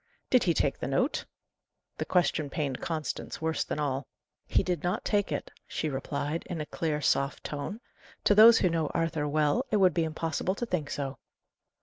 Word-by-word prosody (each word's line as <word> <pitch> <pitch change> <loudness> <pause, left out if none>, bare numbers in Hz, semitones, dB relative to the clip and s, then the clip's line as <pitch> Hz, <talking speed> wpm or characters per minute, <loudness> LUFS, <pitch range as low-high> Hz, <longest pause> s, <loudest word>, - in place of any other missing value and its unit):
"Did 255 - +5
he 170 - +3
take 140 - +1
the - - -3
note?" 135 - 0 0.7
The - - -1
question 170 -5 +1
pained 140 -3 -2
Constance 160 -2 -3
worse 160 0 0
than - - -4
all. 135 -3 -1 0.4
"He - - +2
did 180 -2 -1
not 180 +1 -1
take 205 -5 +1
it," 145 - -3 0.2
she 155 - -2
replied, 145 +3 -2
in 175 - -4
a 150 - -3
clear, 150 -1 -2
soft 140 0 +1
tone. 150 +9 -4 0.4
"To - - +5
those 220 +2 +9
who 180 - +3
know 165 -2 0
Arthur 165 -3 0
well, 150 - +2
it 215 - +2
would 185 -4 +5
be 165 - +1
impossible 160 +3 -1
to 240 - -3
think 160 -9 -2
so." 135 -3 -4
160 Hz, 190 wpm, -29 LUFS, 145-180 Hz, 0.7 s, those